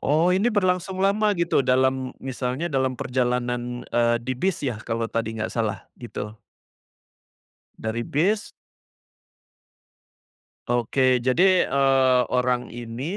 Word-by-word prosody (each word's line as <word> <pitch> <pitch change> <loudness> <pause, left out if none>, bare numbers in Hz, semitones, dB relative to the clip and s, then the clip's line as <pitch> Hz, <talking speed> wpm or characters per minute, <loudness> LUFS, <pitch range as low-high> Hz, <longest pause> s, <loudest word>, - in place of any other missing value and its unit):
Oh 160 +5 +2
ini 200 +6 +2
berlangsung 185 -3 0
lama 205 +1 +2
gitu 170 -4 +2
dalam 130 0 +1
misalnya 130 +5 -3
dalam 130 -2 0
perjalanan, 125 -1 -2
eee, 120 0 +3
di 130 - -1
bis 155 +4 -2
ya, 115 -5 -2
kalau 115 0 -2
tadi 115 -1 -2
nggak 110 - -3
salah 110 -5 -2 0.2
gitu? 105 -3 -6 1.5
Dari 110 +2 -3
bis 195 +9 0 2.2
Oke, 120 +2 0 0.3
jadi, 130 +9 +3 0.2
eee, 135 -2 +3
orang 125 0 0
ini, 120 +1 -7
130 Hz, 115 wpm, -24 LUFS, 120-155 Hz, 2.2 s, eee